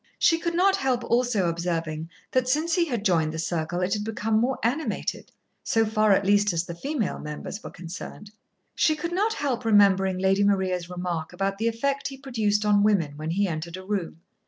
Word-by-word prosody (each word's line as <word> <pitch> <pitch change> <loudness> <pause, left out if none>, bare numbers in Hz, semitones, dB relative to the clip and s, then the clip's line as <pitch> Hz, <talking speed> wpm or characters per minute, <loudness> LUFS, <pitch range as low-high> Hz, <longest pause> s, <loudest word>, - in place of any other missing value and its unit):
She 330 - +3
could 340 0 -2
not 385 +2 +4
help 255 -2 0
also 235 -6 +1
observing 165 -2 -2 0.2
that 255 -1 +1
since 310 +5 +1
he 350 -2 +3
had 240 -9 -3
joined 160 -4 +2
the 160 - -6
circle 165 +1 -2
it 180 +2 0
had 210 -1 -1
become 220 0 0
more 255 +3 +1
animated, 270 +8 -2 0.3
so 225 0 +2
far 215 -1 +2
at 195 0 +3
least 205 0 +3
as 170 0 -1
the 170 - -6
female 245 - -3
members 150 +7 -6
were - - -6
concerned. 185 +4 -9 0.4
She 310 - +2
could 335 +3 -4
not 420 +5 +1
help 270 - -2
remembering 195 -4 +4
Lady 190 +2 +2
Maria's 185 -3 +1
remark 175 -2 -4
about 195 +2 -2
the 225 - +1
effect 275 +5 -1
he 270 - -8
produced 220 -6 0
on 205 -1 +4
women 190 -9 +2
when 155 +1 -5
he 195 +4 +1
entered 165 +1 -4
a 185 - -10
room. 190 -5 -3
205 Hz, 200 wpm, -25 LUFS, 175-245 Hz, 0.4 s, not